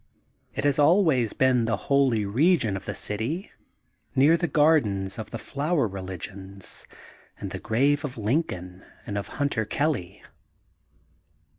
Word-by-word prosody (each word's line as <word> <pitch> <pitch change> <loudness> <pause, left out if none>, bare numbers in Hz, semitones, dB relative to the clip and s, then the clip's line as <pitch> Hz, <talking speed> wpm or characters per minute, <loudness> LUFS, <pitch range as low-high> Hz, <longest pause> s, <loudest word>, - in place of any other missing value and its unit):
It - - -2
has 145 0 +2
always 145 - +4
been 130 -3 +3
the 115 0 0
holy 135 -6 +3
region 120 - +2
of 95 - -6
the - - -4
city, 125 - -3 0.6
near 140 +5 +6
the 175 +1 0
Gardens 110 -13 +2
of 110 0 -6
the 115 - -5
Flower 145 +2 -1
Religions 95 0 -5 0.5
and - - -6
the - - -5
Grave 140 +6 +1
of 135 -4 -5
Lin 115 +9 +2
coln 90 - -9 0.2
and 100 - -5
of 100 - -3
Hunter 140 -6 0
Kelly. 105 - -2
120 Hz, 140 wpm, -26 LUFS, 100-145 Hz, 0.6 s, near